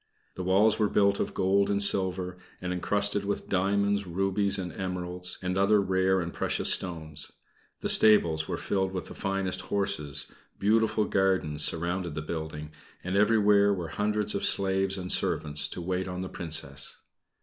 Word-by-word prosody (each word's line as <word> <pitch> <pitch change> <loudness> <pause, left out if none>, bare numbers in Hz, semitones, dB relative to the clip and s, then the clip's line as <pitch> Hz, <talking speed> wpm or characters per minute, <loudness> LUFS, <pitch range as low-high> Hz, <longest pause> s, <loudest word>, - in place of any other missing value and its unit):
The 90 - -6
walls 100 +5 +3
were 105 -2 +2
built 100 -1 +2
of - - -3
gold 100 +1 +2
and 100 - +1
silver, 90 -2 +1 0.2
and 90 0 -3
encrusted 100 +2 0
with 100 0 -3
diamonds, 100 +1 +1
rubies 95 +3 0
and 90 -3 -5
emeralds, 90 -1 -2
and 90 0 -2
other 105 +2 +4
rare 95 -1 +1
and 85 0 -5
precious - - +1
stones. 80 -4 -3 0.5
The - - -2
stables 85 -8 +5
were - - -3
filled 95 -1 -1
with 90 - -5
the - - -8
finest 95 -1 -2
horses; 100 -8 -3 0.3
beautiful 110 +1 +2
gardens 95 -7 0
surrounded 85 0 -2
the 75 - -4
building, 75 -1 -6 0.3
and 90 +1 -3
everywhere 105 -1 +4
were 85 -3 -5
hundreds 105 +4 0
of 100 - -3
slaves 95 0 +1
and 90 -1 -1
servants 75 0 +1
to - - -7
wait 95 +1 -2
on 90 0 -5
the 95 - -5
Princess. 80 -4 -2
95 Hz, 160 wpm, -28 LUFS, 90-100 Hz, 0.5 s, stables